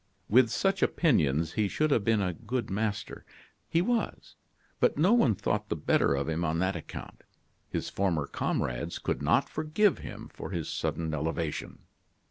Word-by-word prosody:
With 120 Hz, +2 st, +5 dB
such 195 Hz, -, +1 dB
opinions 80 Hz, -, +2 dB
he 105 Hz, -1 st, +1 dB
should 155 Hz, +9 st, 0 dB
have 115 Hz, -, +3 dB
been 110 Hz, -1 st, +2 dB
a 90 Hz, -2 st, -1 dB
good 115 Hz, +2 st, -4 dB
master; 105 Hz, +1 st, -2 dB, 0.5 s
he 165 Hz, +1 st, +2 dB
was, 235 Hz, +1 st, -2 dB, 0.4 s
but -, -, +3 dB
no 180 Hz, +9 st, +4 dB
one 140 Hz, -, +4 dB
thought 105 Hz, +2 st, -2 dB
the -, -, 0 dB
better 75 Hz, -2 st, +2 dB
of 70 Hz, 0 st, -2 dB
him 80 Hz, +1 st, -1 dB
on 80 Hz, 0 st, 0 dB
that 95 Hz, +2 st, 0 dB
account. 85 Hz, -, -8 dB, 0.5 s
His -, -, -3 dB
former 85 Hz, -7 st, 0 dB
comrades -, -, -2 dB
could -, -, -2 dB
not -, -, +3 dB
forgive 160 Hz, +6 st, +1 dB
him -, -, -8 dB
for -, -, -7 dB
his 85 Hz, -5 st, -3 dB
sudden 80 Hz, -1 st, -2 dB
elevation. 80 Hz, +1 st, -3 dB
100 Hz, 165 wpm, -29 LUFS, -, 0.5 s, With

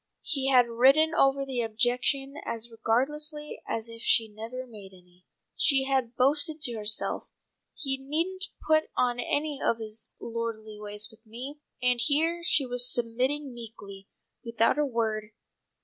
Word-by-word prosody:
He 270 Hz, -3 st, 0 dB
had 250 Hz, -2 st, +6 dB
ridden 270 Hz, +7 st, +4 dB
over 275 Hz, -2 st, +3 dB
her 255 Hz, -3 st, -1 dB
objection 245 Hz, +5 st, 0 dB
as 230 Hz, 0 st, -5 dB
regardlessly 295 Hz, +7 st, -1 dB
as 225 Hz, 0 st, -3 dB
if 230 Hz, 0 st, -10 dB
she 230 Hz, -, +4 dB
had 210 Hz, -1 st, -17 dB
never 240 Hz, +4 st, -6 dB
made 205 Hz, -5 st, -12 dB
any. 180 Hz, 0 st, -21 dB, 0.3 s
She 275 Hz, -3 st, +4 dB
had 265 Hz, -3 st, 0 dB
boasted 295 Hz, +4 st, +3 dB
to 250 Hz, -6 st, +3 dB
herself, 215 Hz, -1 st, 0 dB, 0.5 s
"He 270 Hz, -3 st, -1 dB
needn't 335 Hz, +8 st, -1 dB, 0.2 s
put 310 Hz, 0 st, +4 dB
on 245 Hz, -1 st, +2 dB
any 290 Hz, +3 st, -1 dB
of 230 Hz, -, +2 dB
his 220 Hz, 0 st, -4 dB
lordly 225 Hz, -2 st, -5 dB
ways 210 Hz, 0 st, -5 dB
with 220 Hz, 0 st, -20 dB
me!" 250 Hz, +6 st, -8 dB, 0.2 s
and 250 Hz, -1 st, +3 dB
here 320 Hz, +7 st, +2 dB
she 290 Hz, -4 st, +3 dB
was 245 Hz, 0 st, +1 dB
submitting 255 Hz, +4 st, -1 dB
meekly, 205 Hz, -4 st, -10 dB, 0.4 s
without 230 Hz, +3 st, +2 dB
a 295 Hz, -, +3 dB
word. 220 Hz, -3 st, -2 dB
245 Hz, 150 wpm, -28 LUFS, 225-275 Hz, 0.5 s, had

